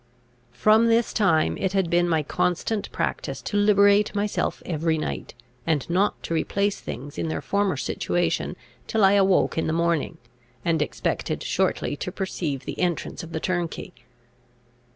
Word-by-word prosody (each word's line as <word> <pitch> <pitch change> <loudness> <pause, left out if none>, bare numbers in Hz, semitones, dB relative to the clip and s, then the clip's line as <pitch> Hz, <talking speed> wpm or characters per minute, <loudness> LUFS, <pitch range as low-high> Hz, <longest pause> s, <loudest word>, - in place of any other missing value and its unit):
From 220 - +5
this 230 0 +2
time 190 -7 +2
it 190 -1 -1
had 190 -3 +2
been 175 +1 +2
my 160 -2 +2
constant 180 +8 -1
practice - - -3
to - - -4
liberate 205 0 +4
myself 205 0 -1
every 160 -1 0
night, 155 - -4 0.3
and 155 -4 +1
not 195 +4 +1
to - - -3
replace 200 +5 0
things 140 +4 -7
in - - -1
their 160 - -2
former 200 -1 0
situation - - -1 0.3
till 220 -2 +1
I 195 - +7
awoke 195 -4 +3
in - - -1
the 160 - 0
morning, 170 -1 0 0.5
and 165 -2 +2
expected 150 - -2
shortly - - 0
to 180 - -4
perceive 175 -8 -3
the - - -6
entrance 175 -2 -1
of 165 - -9
the 160 - -2
turnkey. 175 +1 -3
180 Hz, 155 wpm, -25 LUFS, 160-205 Hz, 0.5 s, I